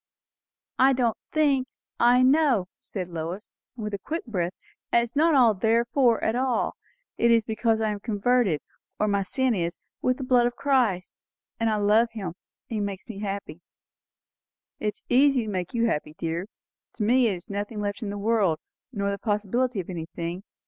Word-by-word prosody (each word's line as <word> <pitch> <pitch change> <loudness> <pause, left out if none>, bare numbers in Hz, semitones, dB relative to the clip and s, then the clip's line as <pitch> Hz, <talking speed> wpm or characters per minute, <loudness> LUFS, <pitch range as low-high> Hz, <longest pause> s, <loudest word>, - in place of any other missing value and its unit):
"I 265 +1 +6
don't 240 -3 +1 0.2
think, 280 -4 +2 0.3
I 245 +1 +5
know," 265 - +4
said 185 -4 -5
Lois, 170 +4 -5 0.3
with 210 -3 -5
a 200 - -2
quick 325 - -4
breath. 185 -6 -2 0.4
"And 235 - +5
it - - 0
is 235 +3 -7
not 265 - +4
'therefore' 235 +2 +3
at 220 - +1
all; 255 -1 0 0.4
it 235 - +4
is 230 -1 +5
because 220 +1 0
I 220 -1 +1
am 205 - -4
covered, 215 -4 +1 0.4
or 210 - +2
my 200 -1 +1
sin 260 +6 +1
is, 170 -4 -2 0.2
with 255 0 +1
the 270 - -5
blood 250 -2 +4
of 240 - -4
Christ. 240 -11 +1 0.4
And 225 0 +2
I 215 - +1
love 210 +3 +3
him; 200 -6 -4
and - - -9 0.4
he 220 - -2
makes 200 -2 -4
me 215 -4 -7
happy." 195 -4 -5 1.2
"It 210 -1 -1
is - - -13
easy 265 0 +4
to 215 - -4
make 185 +2 -3
you 235 0 +2
happy, 150 -7 -2
dear. 170 +3 -3 0.5
To 220 - -3
me 245 +3 +4
there 200 - 0
is 175 - -10
nothing 205 +2 -4
left 205 +2 -3
in 215 - -3
the 205 - -4
world, 200 -6 +2 0.3
nor 200 -4 -1
the 200 - -4
possibility 215 +2 0
of 180 - -5
anything. 170 0 -5
220 Hz, 185 wpm, -26 LUFS, 195-245 Hz, 1.2 s, I